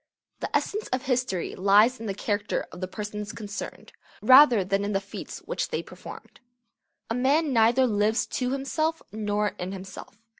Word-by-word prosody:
The - - -3
essence 425 +2 -4
of 255 0 -2
history 250 -9 -1
lies 205 +6 +4
in 225 - -6
the 195 - -3
character 205 0 -2
of 180 - -10
the 185 - -2
persons 210 +1 -6
concerned, 205 -2 -7 0.3
rather 255 -5 +7
than 195 +2 0
in 205 +1 -2
the 195 - +2
feats 195 +1 -9
which - - -2
they - - -2
performed. - - -12 0.7
A - - +2
man 275 +4 +2
neither 235 +3 +4
lives 215 0 +1
to 250 -1 -2
himself 310 +5 -1
nor 210 0 -1
in 180 +2 -4
himself. 190 +1 -9
215 Hz, 165 wpm, -26 LUFS, 200-255 Hz, 0.7 s, rather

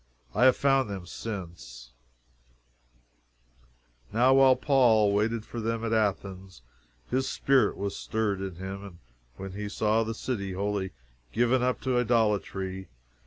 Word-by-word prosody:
I 120 +5 +3
have 130 - +6
found 135 -4 +2
them 95 -3 -6
since: 85 - -8 2.2
"Now 125 +5 +4
while 135 -1 +6
Paul 120 -6 +4
waited 110 +2 0
for 120 - -7
them 115 +1 -2
at 115 - -1
Athens, 95 - -2 0.5
his 130 +1 0
spirit 135 -1 +2
was 100 0 -3
stirred 105 -3 -2
in 95 -2 -5
him, 95 0 -7 0.4
when 95 0 -7
he 105 +2 -5
saw 110 +1 +1
the 115 0 -4
city 100 -6 -3
wholly 100 0 -2 0.4
given 120 +2 +2
up 125 0 0
to 130 -2 +1
idolatry. 100 -5 0
105 Hz, 130 wpm, -28 LUFS, 95-120 Hz, 2.2 s, have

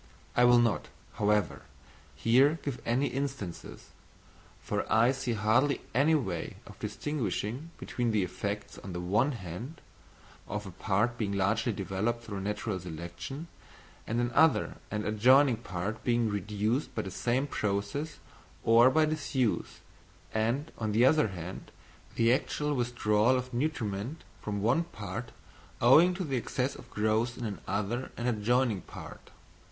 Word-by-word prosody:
I 125 - +6
will 120 0 +7
not, 115 -3 +2 0.3
however, 105 -3 +1 0.5
here 130 - +4
give 140 -4 -4
any 125 +4 +2
instances, 135 -10 -5 0.7
for - - -3
I 115 +3 +5
see 130 -3 -2
hardly 115 +6 +2
any 145 +6 +4
way 95 - -2
of - - -13
distinguishing 130 - -3
between 120 -1 -2
the 105 -3 +2
effects, 100 +3 -4
on 95 - -8
the 90 - -3
one 105 +11 +2
hand, 115 - -7 0.7
of 105 +1 -4
a 95 - -7
part 110 +6 0
being 100 -3 -1
largely 110 +4 +1
developed 100 +4 -2
through 100 -4 -5
natural 105 0 -2
selection 85 - -7 0.6
and 115 +2 0
another 120 +7 +3
and 105 0 -3
adjoining 125 +4 +5
part 100 -1 -4
being 120 -2 +2
reduced 105 +6 -1
by 110 - -1
the 95 - -6
same 125 +8 0
process 105 +6 -2 0.5
or 115 +2 +7
by 155 +3 +4
disuse, 145 -6 -1 0.5
and, 120 +8 0
on 110 -2 -1
the 115 +4 +5
other 150 -1 +5
hand, 90 -2 -7 0.5
the 115 +1 +4
actual 150 +3 -1
withdrawal 120 -2 +2
of 125 0 -5
nutriment 120 -1 -2 0.2
from 100 -1 -3
one 125 +10 +3
part 110 - -6 0.5
owing 160 +9 +6
to 185 - -3
the 135 -6 -1
excess 125 +2 -1
of - - -12
growth 110 +3 0
in 120 - -4 0.2
another 105 +6 -2
and 120 - -2
adjoining 120 -1 +1
part. - - -11
115 Hz, 140 wpm, -30 LUFS, 105-130 Hz, 0.7 s, will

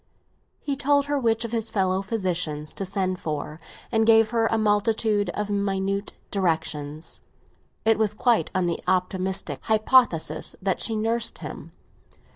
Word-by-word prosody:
He 280 - -2
told 285 +1 +2
her 285 0 0
which 230 -2 +1
of 230 - -6
his 225 -1 -1
fellow 190 -2 +1
physicians 180 -7 -2
to 195 - -3
send 185 -1 -1
for, 150 0 -4 0.3
and 225 -2 +3
gave 225 0 +5
her 230 -1 +2
a 225 - +1
multitude 210 -1 +1
of 210 0 -2
minute 200 0 -1 0.2
directions; 160 -5 -2 0.6
it 225 0 +4
was 215 -1 +1
quite 235 +1 +2
on 185 -1 +2
the 170 -1 -1
optimistic 185 +1 -1
hypothesis 215 - +2
that 190 -1 -1
she 225 - +2
nursed 230 +2 0
him. - - -9
205 Hz, 145 wpm, -25 LUFS, 185-225 Hz, 0.6 s, gave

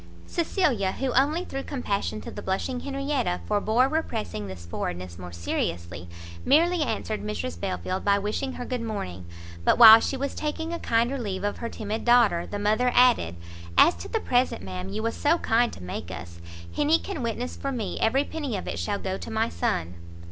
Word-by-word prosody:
Cecilia, 285 - 0
who 265 -1 -2
only 295 +8 +2
through 270 - -4
compassion 200 - -2
to - - -8
the - - -7
blushing 220 +7 -2
Henrietta 275 - -1
forbore 220 +5 +2
repressing 225 - -3
this 90 -3 -9
forwardness 85 +1 -5
more 90 -1 -8
seriously, 85 0 -3 0.3
merely 335 +5 +4
answered 220 - -2
Mrs 85 -5 -4
Belfield 90 - -3
by 200 0 +4
wishing 210 +6 -2
her 245 - -6
good 250 -1 -3
morning; 95 - -5 0.4
but, - - +4
while 225 -1 +11
she 270 - -2
was 280 +1 -2
taking 320 +2 -3
a 340 - -3
kinder 235 +4 +1
leave 195 -5 -3
of 205 - -2
her 235 - -3
timid 215 0 -4
daughter, 235 -8 +4
the 205 - -4
mother 215 +5 +2
added 240 - +4 0.4
"As 345 - +7
to - - -7
the 450 - -1
present, 250 - +1
ma'am, 90 0 -5
you 220 - -3
was 230 - -1
so 310 +3 +2
kind 235 -5 +2
to 90 - -10
make 90 -1 -5
us, 85 -1 -8 0.3
Henny 300 +2 +4
can 335 -4 -5
witness 240 +1 -3
for 275 - -3
me 230 -6 -3
every 265 +5 +3
penny 290 -9 -4
of - - -6
it 85 - -3
shall 85 - -1
go - - -4
to - - -7
my - - 0
son." 85 0 -1
225 Hz, 190 wpm, -26 LUFS, -, 0.4 s, while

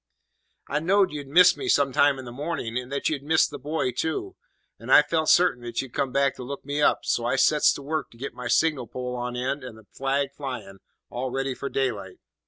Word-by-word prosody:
"I 145 - -1
knowed 190 +4 +2
you'd 145 -2 -6
miss 180 +6 +6
me - - -5
some 140 -1 +3
time 145 0 +4
in 130 - -8
the 120 - -8
morning, 140 -3 -4
and 125 +1 -4
that 140 - -1
you'd 150 -3 -1
miss 160 +3 +3
the 145 - -9
buoy 150 -3 -2
too, 370 - -3 0.4
and - - -6
I - - +8
felt 160 -1 0
sartain 175 -8 +4
that 120 -1 -5
you'd 135 -3 -5
come 135 - -1
back 140 0 +2
to - - -7
look 140 +2 -7
me 145 +1 -2
up, - - +2
so 120 - 0
I 120 +3 0
sets 150 +3 +4
to 140 - -8
work 155 +2 -3
to 115 - -19
get 135 +4 -6
my 125 -1 -6
signal 140 -2 +1
pole 125 +2 -5
on 125 0 -4
end 130 +3 -2
and 125 -3 -9
the 110 - -17
flag 135 +1 -1
flyin', 110 -9 -7 0.3
all 130 +2 -3
ready 135 +1 -2
for 140 +2 -5
daylight. 110 -9 -2
135 Hz, 235 wpm, -25 LUFS, 125-150 Hz, 0.4 s, I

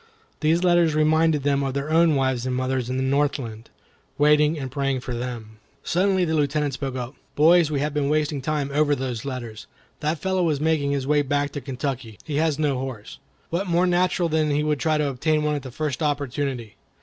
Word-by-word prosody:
These 160 +3 +2
letters 175 -3 +3
reminded 155 -1 +3
them 140 -1 +2
of 135 -1 -2
their 140 +2 -2
own 165 -1 +4
wives 130 -2 0
and 130 - -1
mothers 130 -1 -1
in 130 - -2
the 130 - 0
Northland, 130 -5 -1 0.5
waiting 150 +1 +4
and 135 -3 -5
praying 135 -1 -1
for 125 - -5
them. 120 -3 -6 0.2
Suddenly 185 +1 +2
the 160 - -1
Lieutenant 145 -1 0
spoke 135 0 -4
up: 125 0 -5 0.2
"Boys, 165 +1 +5
we 145 -2 -1
have 150 0 -1
been 145 -1 0
wasting 150 -2 0
time 145 0 -2
over 145 0 +3
those 125 -3 -4
letters. 120 -5 -6 0.3
That 155 +2 -1
fellow 190 +4 -1
was 155 -5 +1
making 155 -2 +1
his 140 -2 -1
way 145 +1 +3
back 145 0 -1
to 145 - -5
Kentucky. 130 -4 -4
He 145 -2 -3
has 155 -2 +1
no 145 -4 0
horse. 130 -5 -7 0.3
What 180 +4 -1
more 175 +1 +2
natural 180 0 +2
than 155 -1 +1
that 145 - +1
he 150 - +1
would 150 -2 0
try 155 -1 +1
and 150 - +1
obtain 150 +3 0
one 150 0 +1
at 145 - -2
the 130 - -8
first 140 +1 -3
opportunity? 140 -5 -2
145 Hz, 210 wpm, -24 LUFS, 130-155 Hz, 0.5 s, Boys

